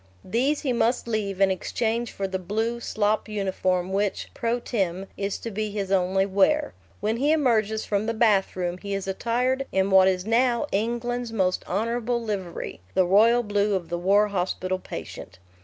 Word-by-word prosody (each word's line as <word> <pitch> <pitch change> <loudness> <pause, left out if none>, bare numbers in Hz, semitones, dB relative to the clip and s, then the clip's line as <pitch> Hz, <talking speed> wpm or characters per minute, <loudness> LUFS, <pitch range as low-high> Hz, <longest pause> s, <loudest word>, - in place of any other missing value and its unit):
These 260 +9 +1
he 260 -4 0
must 235 +1 +1
leave 205 -4 -2
in 195 -1 +4
exchange 230 +5 -1
for 195 - -3
the 190 0 -3
blue 220 +6 -2
slop 215 -1 0
uniform 190 -3 -1
which, 200 0 -1
pro 235 +1 -1
tem., 195 -6 -2
is 200 0 -2
to 230 - -6
be 215 +1 -2
his 200 -2 -4
only 190 0 +2
wear. 200 +11 +2 0.3
When 215 +3 0
he 285 +5 +2
emerges 220 -8 +2
from 205 +1 -1
the 230 - -1
bathroom 190 -5 +1
he 200 0 -4
is 195 -1 -4
attired 250 +7 0
in 190 +1 +1
what 190 0 +7
is 185 -1 0
now 235 +3 +2
England's 240 +3 -1
most 190 -4 0
honourable 235 +4 0
livery 200 - -5
the 185 - +4
royal 225 +6 +5
blue 205 -1 +1
of 175 -3 -4
the 175 0 -2
war 200 +4 +3
hospital 185 -1 -2
patient. 90 - -8
210 Hz, 175 wpm, -25 LUFS, 190-235 Hz, 0.3 s, what